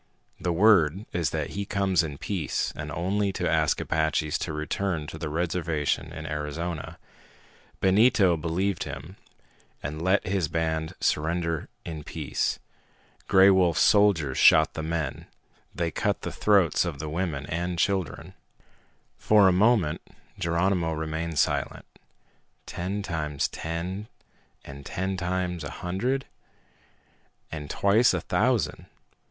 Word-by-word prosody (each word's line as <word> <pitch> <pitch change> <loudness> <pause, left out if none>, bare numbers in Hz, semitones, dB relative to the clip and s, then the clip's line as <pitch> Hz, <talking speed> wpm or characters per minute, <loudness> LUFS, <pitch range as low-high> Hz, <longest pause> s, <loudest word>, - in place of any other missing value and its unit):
The 90 - -1
word 95 -1 +4
is 85 -3 0
that 80 -2 -3
he 100 - -3
comes 100 -3 +1
in 75 -4 -5
peace 90 -3 -2
and 75 0 -6
only 100 +5 0
to - - -1
ask - - +2
Apaches 80 -1 0
to - - -3
return 75 +2 -2
to 80 +1 -8
the 80 - -3
reservation 80 -2 -1
in 80 -1 -7
Arizona. 75 +2 -4 0.8
Benito 95 -2 +4
believed 85 +4 -1
him 75 +6 -8 0.7
and 75 +3 -4
let 95 +3 +2
his 95 -3 0
band 80 0 -2
surrender 85 +1 -1 0.2
in 80 -3 -6
peace. - - -2 0.7
Gray 95 0 +7
Wolf's 90 -4 +3
soldiers 95 -10 +3
shot 80 0 +6
the 80 - -4
men! 80 -4 -3 0.5
They 85 -2 -1
cut - - -1
the - - -3
throats 100 -7 +3
of 85 -5 -4
the 75 +2 -5
women 80 -3 -2
and 85 +3 -3
children!" 95 -1 -1 0.9
For 105 -2 +5
a - - +5
moment 95 -5 +3 0.4
Geronimo 85 0 +1
remained 80 +1 -3
silent. - - 0 0.8
Ten 95 +3 -4
times 75 -6 -2
ten, 90 +6 -5 0.6
and 70 0 -10
ten 95 +6 -3
times 90 -2 -2
a 70 - -5
hundred, 120 - -2 1.3
and 75 -3 -6
twice 110 +5 +3
a - - -2
thousand. - - 0
85 Hz, 130 wpm, -26 LUFS, 80-95 Hz, 1.3 s, Gray